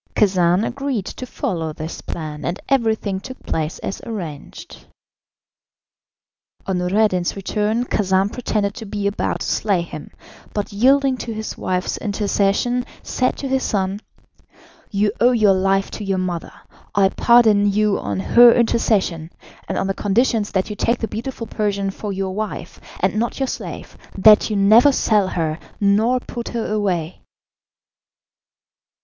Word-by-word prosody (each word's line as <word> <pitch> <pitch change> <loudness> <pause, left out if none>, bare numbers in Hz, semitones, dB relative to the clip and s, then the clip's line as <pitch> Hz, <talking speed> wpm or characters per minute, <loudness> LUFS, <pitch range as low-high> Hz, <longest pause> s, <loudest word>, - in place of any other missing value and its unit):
Khacan 185 -1 +3
agreed 270 -6 -3
to 255 - -7
follow 165 -8 -3
this 155 +2 -7
plan, 155 -2 -6
and 175 +3 -3
everything 220 -7 0
took 260 +6 -10
place 155 0 -2
as - - -4
arranged. 170 -11 -8 1.8
On 190 -2 -1
Noureddin's 185 -1 +1
return 210 +4 -1
Khacan 195 -2 +1
pretended 210 -4 -1
to 220 - -8
be 205 0 -4
about 200 0 -1
to - - -2
slay 200 -4 +1
him, 160 -3 -9 0.5
but 205 0 -3
yielding 265 +4 +3
to 230 -2 -5
his 220 0 -5
wife's 185 0 -2
intercession, 205 +3 0 0.2
said 255 - -1
to 275 - -4
his 265 0 0
son: 195 -3 -1 0.9
"You 205 0 +1
owe 245 +1 +5
your 215 -4 +4
life 195 +1 +1
to 215 - -6
your 195 -1 -1
mother. 180 -2 -3 0.4
I 195 -1 +4
pardon 215 -3 +4
you 210 0 +1
on 100 -2 -3
her 240 - +7
intercession, 205 -8 +1 0.4
and - - -2
on - - 0
the 195 - 0
conditions 215 +2 +1
that 190 +2 0
you - - -4
take 235 +4 +1
the 225 - -3
beautiful 230 +3 -5
Persian 200 -3 -1
for 205 +1 -6
your 190 -1 -3
wife, 215 +1 -5 0.2
and 190 +3 +1
not 235 +4 -1
your 270 - +1
slave, - - -7 0.2
that 210 +3 +6
you 215 - -1
never 215 +8 +6
sell 210 -6 +2
her, 160 -3 -2 0.2
nor 215 +5 +3
put 240 -1 -7
her 235 -2 -3
away." 185 -6 -2
205 Hz, 150 wpm, -20 LUFS, 190-225 Hz, 1.8 s, her